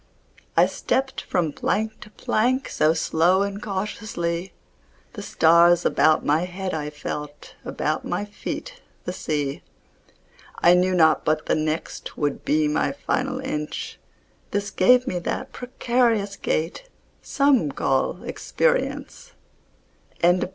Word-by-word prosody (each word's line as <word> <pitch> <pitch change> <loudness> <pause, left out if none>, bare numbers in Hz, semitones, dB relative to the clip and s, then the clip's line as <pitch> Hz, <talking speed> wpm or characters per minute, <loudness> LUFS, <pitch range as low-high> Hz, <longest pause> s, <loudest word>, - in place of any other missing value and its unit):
I - - +7
stepped 265 0 -1
from 165 -5 -1
plank 220 +7 -1
to 215 - -12
plank 250 +5 0
So 155 +1 +2
slow 170 +4 +2
and 200 +1 -4
cautiously; 190 -3 -3 0.6
The - - -7
stars 170 +1 +4
about 155 -1 +3
my 155 +4 +2
head 185 +1 -5
I 150 -1 -3
felt, 150 0 -7
About - - -2
my 205 - -2
feet - - -7 0.2
the 180 - -3
sea. 145 -5 -2 1.0
I 175 - +5
knew 185 +1 +3
not 160 -4 +4
but 155 0 0
the - - +1
next 155 +1 -3
Would 145 -2 -1
be 155 0 +2
my 150 - 0
final 270 -2 -2
inch, 265 - -4 0.5
This 205 -1 -2
gave 250 +6 +4
me 180 -8 -2
that 170 - -4
precarious 235 -5 0
gait 170 - -2 0.3
Some 275 - +2
call 135 +7 0
experience. - - -2 0.9
LIV. 175 +1 +3
180 Hz, 125 wpm, -24 LUFS, 155-225 Hz, 1.0 s, I